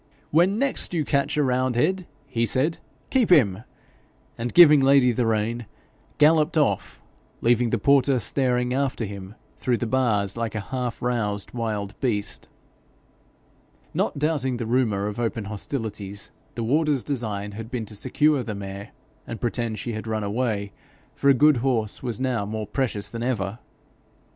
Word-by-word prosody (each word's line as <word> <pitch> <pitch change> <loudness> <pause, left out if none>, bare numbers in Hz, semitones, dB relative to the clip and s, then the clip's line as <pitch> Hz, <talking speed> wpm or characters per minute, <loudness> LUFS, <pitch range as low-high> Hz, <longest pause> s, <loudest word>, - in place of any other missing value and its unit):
'When 180 +6 +3
next 270 -8 +1
you 155 -3 0
catch 140 +1 0
a 150 - +3
roundhead,' 130 +8 +1 0.2
he 115 -4 -1
said, 145 +9 0 0.3
'keep 255 -5 +3
him;' 110 - +4 0.7
and 120 +1 -3
giving 150 -4 +8
Lady 135 -2 +5
the 120 0 0
rein, 115 +1 -1 0.5
galloped 155 +2 +4
off, 150 -3 0 0.4
leaving 120 0 +3
the 120 - +1
porter 140 +3 +3
staring 125 0 0
after 130 -3 -1
him 100 0 -8 0.2
through 125 -2 0
the 120 - -2
bars 110 -5 +1
like 115 -2 -3
a - - -1
half 125 -3 -3
roused 105 -5 -1
wild 105 -4 -3
beast. 110 -6 -2 1.5
Not - - -1
doubting 140 -4 0
the 120 - -3
rumour 110 -4 +1
of 105 +2 -4
open 115 -2 -1
hostilities, 105 -1 -5 0.2
the 115 - -3
warder's 145 +2 +1
design 105 -7 -3
had 110 +2 -8
been 120 -3 -3
to 105 - -10
secure 145 +5 +2
the 110 -3 -5
mare, 100 +1 -7 0.3
and 115 - -6
pretend 115 -1 -2
she 120 - -4
had 110 +1 -6
run 110 -1 -1
away, 105 -1 -1 0.4
for 140 - +2
a 135 - +6
good 150 +2 +5
horse 115 -4 -1
was 120 -4 -3
now 130 -5 0
more 110 +1 -4
precious 110 -3 -2
than 115 - -7
ever. 115 -3 -2
120 Hz, 160 wpm, -24 LUFS, 110-135 Hz, 1.5 s, giving